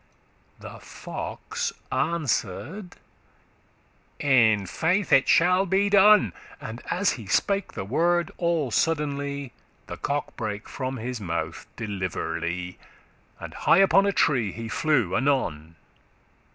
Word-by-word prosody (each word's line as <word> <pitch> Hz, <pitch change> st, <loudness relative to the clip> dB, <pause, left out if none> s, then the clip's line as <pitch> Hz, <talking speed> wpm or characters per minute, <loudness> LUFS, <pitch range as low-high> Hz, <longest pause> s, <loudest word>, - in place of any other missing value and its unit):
'" -, -, -36 dB
The -, -, -10 dB
fox -, -, -5 dB, 0.2 s
answer'd, 165 Hz, -, -2 dB, 1.2 s
"In 110 Hz, -7 st, +3 dB
faith 175 Hz, -, 0 dB
it 135 Hz, -, +5 dB
shall 180 Hz, +3 st, +4 dB
be 195 Hz, +3 st, +1 dB
done:" 200 Hz, -, +6 dB, 0.3 s
And, 115 Hz, +2 st, -8 dB
as 195 Hz, +3 st, +1 dB
he 110 Hz, -5 st, -7 dB
spake 200 Hz, -, 0 dB
the 95 Hz, -, -5 dB
word, 170 Hz, -, +1 dB
all 170 Hz, -7 st, 0 dB
suddenly 140 Hz, -2 st, -1 dB, 0.3 s
The -, -, -8 dB
cock 145 Hz, +1 st, -3 dB
brake 105 Hz, -4 st, -5 dB
from 130 Hz, -1 st, -4 dB
his 120 Hz, 0 st, -5 dB
mouth 85 Hz, -3 st, -4 dB
deliverly,* 90 Hz, -4 st, -3 dB
*nimbly 90 Hz, +1 st, -10 dB, 0.6 s
And -, -, -8 dB
high -, -, +3 dB
upon 195 Hz, +1 st, +5 dB
a -, -, +3 dB
tree 125 Hz, -, +1 dB
he 115 Hz, +3 st, -7 dB
flew 150 Hz, +4 st, +1 dB
anon. 85 Hz, -, -1 dB
140 Hz, 125 wpm, -25 LUFS, 105-175 Hz, 1.2 s, done